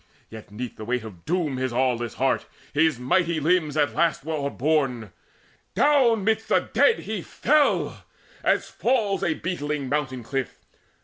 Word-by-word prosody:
But 110 -1 -10
'neath 115 +4 -7
the 110 - -7
weight 125 0 -1
Of 95 -7 -11
doom 160 -5 -1
his 130 -1 -1
aweless 120 -2 0
heart, 135 +2 0 0.3
his 155 -1 +3
mighty 165 +6 +1
limbs, 155 -1 +1
At 145 -1 +2
last 165 -4 +1
were 160 - -3
overborne. 140 - -1 0.6
Down 240 -3 +4
midst 220 +1 +1
the - - +1
dead 465 - +4
He 215 -3 -4
fell, 295 - +1 0.4
as - - +2
fails 225 -6 0
a 155 - +1
beetling 150 -6 -3
mountain 135 -4 -2
cliff. 135 +2 -3
150 Hz, 150 wpm, -24 LUFS, 125-185 Hz, 0.6 s, Down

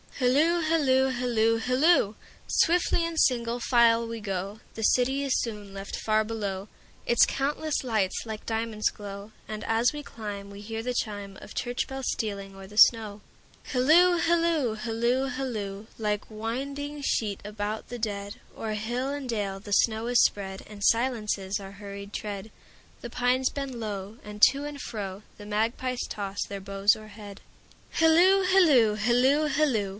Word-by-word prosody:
Hilloo, 300 +7 +3
hilloo, 275 -5 +3
hilloo, 235 -3 +1
hilloo! 255 - +3 0.3
Swiftly 340 0 +2
in 335 -1 -4
single 240 -4 +2
file 235 -1 +4
we 230 0 -5
go, 195 0 -4 0.2
The 220 - -5
city 265 +5 +2
is 275 -2 +1
soon 210 -4 -6
left 195 0 -6
far 215 0 +1
below, 205 -3 -4 0.4
Its 235 - +6
countless 295 +2 -1
lights 215 -7 0
like 220 -1 -7
diamonds 225 -1 -1
glow; 200 0 -9 0.2
And 215 0 -5
as 225 +4 +2
we 295 0 -6
climb 205 -5 -7
we 200 0 -10
hear 225 +2 -5
the 250 +1 -2
chimeOf 205 -3 -5
church 245 0 -2
bells 265 -1 -5
stealing 200 -3 -4
o'er 195 0 -10
the 210 +2 -13
snow. 215 -3 +5 0.5
Hilloo, 330 +8 +5
hilloo, 330 -8 +2
hilloo, 235 +4 0
hilloo! 215 -6 -4
Like 210 -2 -1
winding 275 +7 -4
sheet 210 -6 0
about 210 +1 -4
the 245 0 -6
dead, 205 -2 -3 0.2
O'er 220 -1 -4
hill 240 +5 -2
and 285 -2 -4
dale 205 -4 -2
the 205 +1 -6
snow 220 +2 +2
is 245 0 +4
spread, 190 -1 -1
And 205 -1 -9
silences 215 -5 +1
our 195 -1 -9
hurried 200 0 -9
tread; 205 0 -5 0.5
The 240 - -6
pines 250 +2 +1
bend 275 -4 -5
low, 205 -1 -5
and 210 0 -9
to 280 +2 -5
and 295 -1 -6
froThe 205 -1 -7
magpies 235 +4 -1
toss 200 -1 -4
their 200 -1 -7
boughs 195 +1 +2
o'erhead. 210 -2 -11 0.5
Hilloo, 350 +4 +5
hilloo, 300 - +5
hilloo, 250 +7 +3
hilloo! 260 -11 +1
225 Hz, 155 wpm, -27 LUFS, 205-260 Hz, 0.5 s, Its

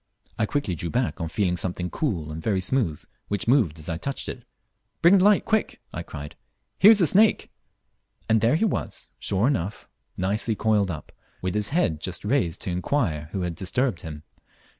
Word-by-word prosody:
I 110 - +2
quickly 140 -9 -1
drew 85 0 -4
back 120 -4 -1
on 85 - -1
feeling 90 -1 0
something 90 0 -3
cool 85 - -2
and 80 +1 -6
very 100 +1 0
smooth, 95 - -1 0.2
which 100 +2 -2
moved 115 - +3
as 75 - -8
I 85 -2 -2
touched 140 +10 -4
it. - - -6 0.6
"Bring 185 +3 +7
the - - +3
light, 205 0 +5
quick," 220 -1 0
I - - -4
cried; 75 +1 -8 0.4
"here's 210 +1 +8
a - - +6
snake." 210 +7 +3 0.8
And 110 0 +3
there 115 +6 +4
he 185 - +2
was, 215 - -3
sure 100 +2 0
enough, 110 -7 -1 0.3
nicely 105 +4 0
coiled 105 -2 +2
up, 80 -4 -6 0.3
with 95 - -1
his 105 -1 +2
head 85 - +1
just 95 +3 -4
raised 105 - 0
to 90 - -3
inquire 90 - -1
who 95 - -3
had 90 -1 -2
disturbed 100 +2 -1
him. 75 -4 -8
100 Hz, 185 wpm, -25 LUFS, 85-135 Hz, 0.8 s, here's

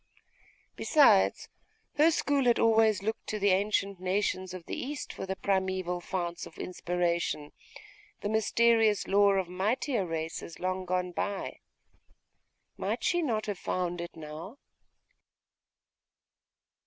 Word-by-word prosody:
Besides, 235 - +4 0.5
her 305 +3 +6
school 285 -4 +1
had 240 -1 +4
always 220 -3 +4
looked 220 +2 -3
to 215 - -2
the 200 -1 +3
ancient 195 0 +1
nations 185 0 -1
of 180 -2 -8
the - - -4
East 285 +2 -5
for - - -6
the 190 - -2
primeval 185 -2 -1
founts 175 -2 -4
of - - -16
inspiration, 175 -4 -2 0.7
the - - -2
mysterious 220 0 +3
lore 200 0 +4
of 190 -2 0
mightier 210 +6 0
races 165 0 -5
long 185 0 -2
gone 180 0 -1
by. 195 +3 -3 1.2
Might - - -2
she 350 - +2
not 225 -9 -1
have 205 -3 -4
found 175 -1 -2
it 170 - -7
now? 160 - -8
190 Hz, 125 wpm, -29 LUFS, 180-220 Hz, 1.2 s, her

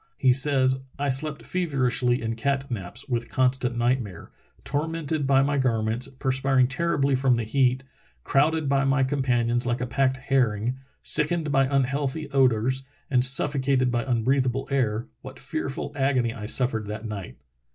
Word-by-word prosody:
He 130 -2 +4
says: 130 -1 +3 0.2
"I 145 0 -1
slept 140 +2 -2
feverishly 130 -8 0
in 115 0 -2
cat 135 +3 -2
naps, 95 -2 -6
with 120 -3 -2
constant 125 -2 0
nightmare. 120 -7 -2 0.3
Tormented 155 0 -2
by 135 0 +4
my 140 0 0
garments, 115 -1 0
perspiring 130 -1 +1
terribly 140 0 0
from 130 -1 +3
the 115 - -2
heat, 130 +2 +1 0.4
crowded 155 +2 +1
between 135 0 +2
my 135 0 +2
companions 125 -3 0
like 120 0 0
a 125 - -2
packed 130 +1 0
herring, 125 -3 0 0.2
sickened 155 0 +2
by 135 -1 +3
unhealthy 140 +2 -1
odors, 130 -1 +2 0.3
and 125 -2 +3
suffocated 135 -1 +2
by 120 -1 0
unbreathable 130 +1 0
air, 115 -5 0 0.2
what 130 0 -10
fearful 140 +1 -4
agony 130 -4 +1
I 105 -4 -7
suffered 115 -3 0
that 105 +2 -6
night! 105 -4 -7
130 Hz, 150 wpm, -25 LUFS, 120-140 Hz, 0.4 s, He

